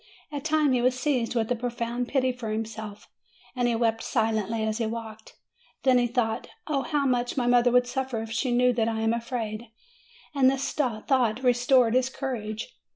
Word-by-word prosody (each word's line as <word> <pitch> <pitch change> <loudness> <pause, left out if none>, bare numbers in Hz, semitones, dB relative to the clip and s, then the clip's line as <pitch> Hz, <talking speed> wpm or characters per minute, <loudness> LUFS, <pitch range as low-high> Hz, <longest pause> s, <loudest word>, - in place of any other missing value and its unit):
At 285 -2 -5
times 310 -3 +2
he 245 - +2
was 255 +1 +2
seized 250 -4 0
with 225 0 0
a - - +3
profound 240 0 -3
pity 260 -1 +1
for 245 -3 -6
himself, 215 -1 -5 0.5
and 245 -1 +1
he 235 - +1
wept 225 -1 +1
silently 220 -2 0
as 220 +1 -1
he 225 - 0
walked. 220 -1 -7 0.5
Then 255 -2 +5
he 240 - +2
thought, 235 -1 -1 0.2
"Oh 290 -3 0
how 290 0 -1
much 245 0 0
my 250 - +1
mother 245 0 +4
would 250 0 +4
suffer 255 -1 -3
if 225 - -8
she 245 +2 -1
knew 250 +1 +3
that 225 -2 +1
I 225 -1 -1
am 225 +1 +2
afraid!" 235 -1 -4 0.7
and 270 -2 +5
this 270 0 -1
thought 245 -2 0
restored 245 -1 +4
his 255 0 +2
courage. 245 - -5
245 Hz, 190 wpm, -26 LUFS, 225-255 Hz, 0.7 s, Then